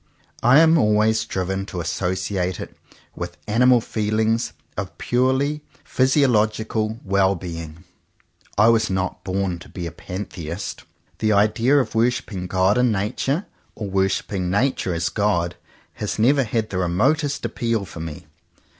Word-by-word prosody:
I 125 Hz, +4 st, +6 dB
am 165 Hz, 0 st, +6 dB
always 110 Hz, 0 st, +3 dB
driven 95 Hz, -1 st, -2 dB
to 90 Hz, -, -5 dB
associate 90 Hz, +1 st, -2 dB
it -, -, -8 dB, 0.4 s
with 85 Hz, 0 st, -6 dB
animal 120 Hz, +3 st, +4 dB
feelings 110 Hz, +1 st, 0 dB, 0.2 s
of 95 Hz, 0 st, -5 dB
purely 130 Hz, +4 st, +1 dB, 0.2 s
physiological 110 Hz, -4 st, +1 dB
well 100 Hz, 0 st, +2 dB
being. 85 Hz, -2 st, -7 dB, 0.7 s
I 105 Hz, +2 st, +6 dB
was 110 Hz, -1 st, +3 dB
not 95 Hz, 0 st, -2 dB
born 95 Hz, -2 st, -2 dB
to -, -, -13 dB
be 90 Hz, -, -6 dB
a 85 Hz, -, -4 dB
Pantheist. 90 Hz, -1 st, -6 dB, 0.3 s
The 110 Hz, -1 st, +2 dB
idea 115 Hz, +7 st, +3 dB
of 135 Hz, -, 0 dB
worshipping 110 Hz, -5 st, 0 dB
God 95 Hz, +5 st, +2 dB
in 125 Hz, -1 st, +3 dB
Nature, 125 Hz, -, -1 dB, 0.3 s
or 100 Hz, -3 st, -5 dB
worshipping 95 Hz, -1 st, 0 dB
Nature 100 Hz, -3 st, 0 dB
as 85 Hz, 0 st, 0 dB
God, 90 Hz, -5 st, 0 dB, 0.4 s
has 105 Hz, -, -4 dB
never 135 Hz, +4 st, +3 dB
had 110 Hz, -1 st, -2 dB
the 95 Hz, -, -1 dB
remotest 135 Hz, -, +1 dB
appeal 115 Hz, -2 st, -1 dB
for 85 Hz, -, -10 dB
me. 80 Hz, -3 st, -7 dB
105 Hz, 135 wpm, -22 LUFS, 95-115 Hz, 0.7 s, I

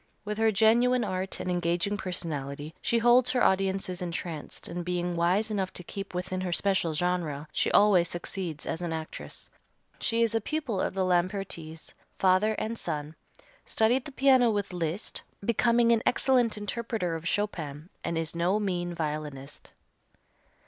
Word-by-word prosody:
With 210 Hz, +1 st, -3 dB
her 225 Hz, 0 st, +4 dB
genuine 235 Hz, +4 st, +4 dB
art 190 Hz, -1 st, -3 dB
and 180 Hz, -, -2 dB
engaging 175 Hz, +3 st, 0 dB
personality 155 Hz, -6 st, -4 dB
she 235 Hz, -, +2 dB
holds 240 Hz, +2 st, +5 dB
her 255 Hz, -1 st, +2 dB
audiences 190 Hz, -1 st, +1 dB
entranced 170 Hz, -3 st, -4 dB
and, 175 Hz, +1 st, -4 dB
being 175 Hz, 0 st, -1 dB
wise 185 Hz, +6 st, +2 dB
enough 195 Hz, -3 st, -1 dB
to 180 Hz, -, -4 dB
keep 195 Hz, +1 st, -7 dB
within 185 Hz, +1 st, -2 dB
her 185 Hz, -1 st, -2 dB
special 175 Hz, -3 st, +1 dB
genre, 160 Hz, -4 st, -1 dB
she -, -, +1 dB
always 195 Hz, -4 st, +5 dB
succeeds 175 Hz, -3 st, -4 dB
as 165 Hz, -, -3 dB
an 170 Hz, -2 st, -2 dB
actress. 160 Hz, -1 st, -6 dB, 0.5 s
She 230 Hz, 0 st, +2 dB
is 230 Hz, -1 st, +1 dB
a 225 Hz, -, +1 dB
pupil 260 Hz, -6 st, -2 dB
of -, -, -2 dB
the 190 Hz, -1 st, +1 dB
Lampertis, 175 Hz, -3 st, -2 dB, 0.2 s
father 190 Hz, +3 st, +3 dB
and 225 Hz, +2 st, -3 dB
son, 150 Hz, 0 st, -4 dB, 0.5 s
studied 240 Hz, +4 st, +2 dB
the 295 Hz, -, -7 dB
piano 260 Hz, -3 st, +5 dB
with 205 Hz, -3 st, -1 dB
Liszt, 170 Hz, +2 st, -3 dB, 0.2 s
becoming 235 Hz, +1 st, +3 dB
an 230 Hz, -1 st, +4 dB
excellent 245 Hz, -4 st, +2 dB
interpreter 210 Hz, -4 st, -2 dB
of 165 Hz, +1 st, -5 dB
Chopin, 165 Hz, -7 st, -2 dB, 0.2 s
and 170 Hz, -, -2 dB
is 165 Hz, -1 st, -1 dB
no 175 Hz, +5 st, +1 dB
mean 175 Hz, -4 st, -2 dB
violinist. 150 Hz, -3 st, -5 dB
185 Hz, 155 wpm, -28 LUFS, 170-220 Hz, 0.5 s, holds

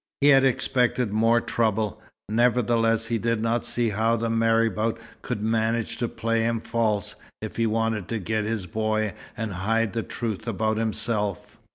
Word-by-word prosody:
He 145 Hz, -, +5 dB
had 135 Hz, -2 st, +7 dB
expected 125 Hz, -3 st, +1 dB
more 115 Hz, +2 st, +4 dB
trouble. 110 Hz, -3 st, -1 dB, 0.3 s
Nevertheless, 115 Hz, 0 st, +2 dB
he 115 Hz, 0 st, -1 dB
did 115 Hz, +1 st, 0 dB
not 115 Hz, +1 st, 0 dB
see 120 Hz, -1 st, 0 dB
how 110 Hz, +3 st, +1 dB
the 115 Hz, 0 st, -1 dB
marabout 115 Hz, -1 st, +2 dB, 0.2 s
could 110 Hz, -4 st, -4 dB
manage 115 Hz, 0 st, 0 dB
to 120 Hz, -, -1 dB
play 115 Hz, 0 st, -1 dB
him 115 Hz, 0 st, 0 dB
false, 110 Hz, -3 st, -1 dB, 0.3 s
if -, -, -7 dB
he 115 Hz, -1 st, +2 dB
wanted 110 Hz, -3 st, 0 dB
to 115 Hz, -, -2 dB
get 110 Hz, +2 st, -1 dB
his 110 Hz, -3 st, -2 dB
boy 110 Hz, +2 st, -1 dB, 0.2 s
and 110 Hz, -2 st, -3 dB
hide 110 Hz, +3 st, 0 dB
the 115 Hz, -, -1 dB
truth 110 Hz, -1 st, -4 dB
about 110 Hz, 0 st, 0 dB
himself. 105 Hz, -3 st, -2 dB
115 Hz, 165 wpm, -25 LUFS, 110-115 Hz, 0.3 s, had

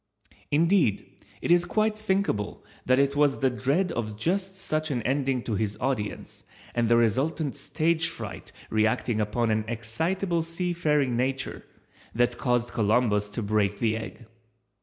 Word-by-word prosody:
Indeed, 165 Hz, -, +2 dB, 0.2 s
it -, -, +1 dB
is 175 Hz, 0 st, +6 dB
quite 215 Hz, 0 st, +1 dB
thinkable 195 Hz, -, -1 dB, 0.2 s
that 130 Hz, 0 st, +4 dB
it 140 Hz, 0 st, +2 dB
was 145 Hz, -1 st, +3 dB
the 130 Hz, -2 st, +2 dB
dread 145 Hz, +9 st, 0 dB
of 110 Hz, -5 st, -3 dB
just 190 Hz, -, -1 dB
such 155 Hz, -4 st, -2 dB
an 125 Hz, -5 st, -1 dB
ending 135 Hz, -1 st, 0 dB
to 115 Hz, -, -3 dB
his 105 Hz, 0 st, -1 dB
audience 125 Hz, -5 st, -3 dB, 0.3 s
and 120 Hz, -2 st, +1 dB
the 120 Hz, -, +5 dB
resultant 135 Hz, +6 st, +1 dB
stage 165 Hz, +3 st, 0 dB
fright 105 Hz, -, -7 dB, 0.2 s
reacting 110 Hz, +1 st, +1 dB
upon 110 Hz, +2 st, 0 dB
an 110 Hz, 0 st, +1 dB
excitable 165 Hz, -, -1 dB
sea 165 Hz, +2 st, -2 dB
faring 150 Hz, -7 st, +1 dB
nature 130 Hz, +2 st, -2 dB, 0.5 s
that 120 Hz, +1 st, +1 dB
caused 120 Hz, -1 st, +1 dB
Columbus 105 Hz, -1 st, +2 dB
to 105 Hz, +2 st, -4 dB
break 105 Hz, -1 st, +1 dB
the 110 Hz, -2 st, +1 dB
egg. 110 Hz, +2 st, -7 dB
130 Hz, 150 wpm, -27 LUFS, 110-165 Hz, 0.5 s, is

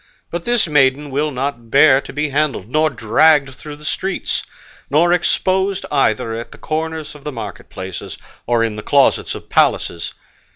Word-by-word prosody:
But 170 Hz, 0 st, -4 dB
this 240 Hz, -2 st, +2 dB
maiden 145 Hz, -2 st, +2 dB
will 145 Hz, +3 st, 0 dB
not 130 Hz, -4 st, -4 dB
bear 140 Hz, +1 st, +6 dB
to -, -, -10 dB
be 150 Hz, +1 st, -2 dB
handled, 140 Hz, -8 st, -1 dB
nor 155 Hz, +5 st, +2 dB
dragged 135 Hz, +3 st, +3 dB
through 150 Hz, +3 st, -9 dB
the 150 Hz, +1 st, -14 dB
streets, 190 Hz, +5 st, -2 dB, 0.5 s
nor 170 Hz, +5 st, +4 dB
exposed 190 Hz, +2 st, +1 dB
either 115 Hz, -5 st, +1 dB
at 115 Hz, +1 st, -6 dB
the -, -, -12 dB
corners 160 Hz, -1 st, -4 dB
of 150 Hz, -2 st, -14 dB
the 150 Hz, -, -4 dB
market 105 Hz, -7 st, -8 dB
places, 95 Hz, -1 st, -7 dB, 0.3 s
or 120 Hz, -1 st, +2 dB
in 110 Hz, -2 st, -2 dB
the -, -, -4 dB
closets 140 Hz, +4 st, +2 dB
of -, -, -10 dB
palaces. 85 Hz, -1 st, +1 dB
145 Hz, 170 wpm, -18 LUFS, 120-155 Hz, 0.5 s, bear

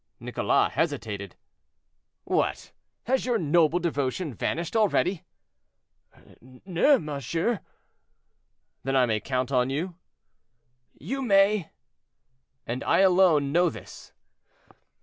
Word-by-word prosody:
Nicholas -, -, 0 dB
hesitated. 100 Hz, -4 st, -3 dB, 0.9 s
"What! -, -, -1 dB, 0.3 s
has 260 Hz, +2 st, 0 dB
your 245 Hz, -2 st, +1 dB
noble 165 Hz, -1 st, +2 dB
devotion 150 Hz, -2 st, -2 dB
vanished 170 Hz, -, -3 dB
already?" 200 Hz, -4 st, +1 dB, 1.4 s
"No, 195 Hz, -, +4 dB
monsieur." 165 Hz, -, -2 dB, 1.2 s
"Then 135 Hz, +1 st, -1 dB
I 130 Hz, -1 st, +4 dB
may 110 Hz, -3 st, 0 dB
count 130 Hz, +2 st, -2 dB
on 125 Hz, -1 st, +2 dB
you?" 165 Hz, +7 st, -3 dB, 1.1 s
"You 270 Hz, +1 st, -4 dB
may." 200 Hz, -, +3 dB, 1.0 s
"And 120 Hz, +2 st, -4 dB
I -, -, +3 dB
alone 180 Hz, -7 st, +4 dB
know 175 Hz, +3 st, +3 dB
this?" -, -, -12 dB
165 Hz, 95 wpm, -26 LUFS, 135-195 Hz, 1.4 s, No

